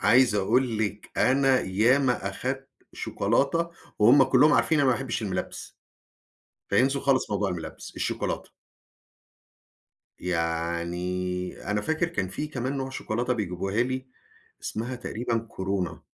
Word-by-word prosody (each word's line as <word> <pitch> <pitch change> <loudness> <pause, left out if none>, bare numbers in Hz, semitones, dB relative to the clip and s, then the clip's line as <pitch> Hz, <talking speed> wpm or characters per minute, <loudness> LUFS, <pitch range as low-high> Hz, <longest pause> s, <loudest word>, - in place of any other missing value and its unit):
عايز 125 -3 +5
أقول 115 +3 +2
لكِ 105 -1 -3
أنا 135 -1 +4
ياما 115 +3 +2
أخدت 130 +6 -4 0.2
شوكولاتة، 140 +11 0 0.3
وهم 120 +7 +7
كلهم 135 +3 +5
عارفين 160 +1 +3
إن 140 - +3
أنا 130 - +5
ما 120 - +2
باحبش 130 -3 -3
المِلبِّس. 90 -3 -4 0.9
فينسوا 135 +7 +3
خالص 135 -5 +2
موضوع 100 -1 +1
المِلبِّس، 85 -2 -6
الشوكولاتة. - - -2 1.7
يعني 90 +2 -2
أنا 105 - +1
فاكر 160 +9 0
كان 95 - -2
في 150 +11 -4
كمان 135 -1 -3
نوع 135 0 -3
شوكولاتة 120 0 -2
بيجيبوها 95 0 -1
لي، 130 +1 -3 0.6
إسمها 120 +4 -3
تقريبًا 120 -1 -2
كورونا. 95 -5 -3
115 Hz, 125 wpm, -27 LUFS, 95-130 Hz, 1.7 s, وهم